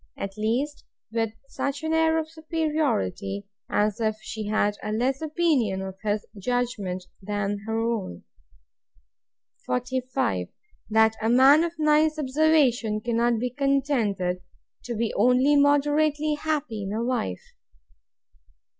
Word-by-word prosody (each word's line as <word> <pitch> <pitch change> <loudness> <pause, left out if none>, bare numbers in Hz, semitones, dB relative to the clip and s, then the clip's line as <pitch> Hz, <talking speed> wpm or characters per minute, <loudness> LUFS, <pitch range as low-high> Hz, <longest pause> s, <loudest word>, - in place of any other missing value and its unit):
At 195 0 -5
least, 245 +8 -1 0.3
with 225 -1 -1
such 280 +2 -3
an 315 0 0
air 320 0 +3
of 320 -1 -1
superiority, 300 - -1 0.2
as 210 +1 +1
if 215 -1 0
she 215 0 -6
had 205 -1 +1
a 210 - -4
less 255 +6 0
opinion 295 - +1
of 190 -1 -6
his 210 -1 -1
judgment 205 -5 -2 0.2
than 205 0 -2
her 225 0 -1
own. 225 - -2 1.4
45. 250 - -1 0.4
That 220 0 +4
a 220 - +1
man 270 +6 +6
of 340 -1 -2
nice 305 0 +3
observation 265 -7 +2
cannot 235 0 +1
be 245 +2 -2
contented 245 -10 0 0.4
to 240 0 -3
be 225 0 -1
only 250 +6 +4
moderately 295 +1 +3
happy 295 -8 -2
in 195 0 -4
a 225 +2 -1
wife. 235 - -3
245 Hz, 125 wpm, -25 LUFS, 210-295 Hz, 1.4 s, man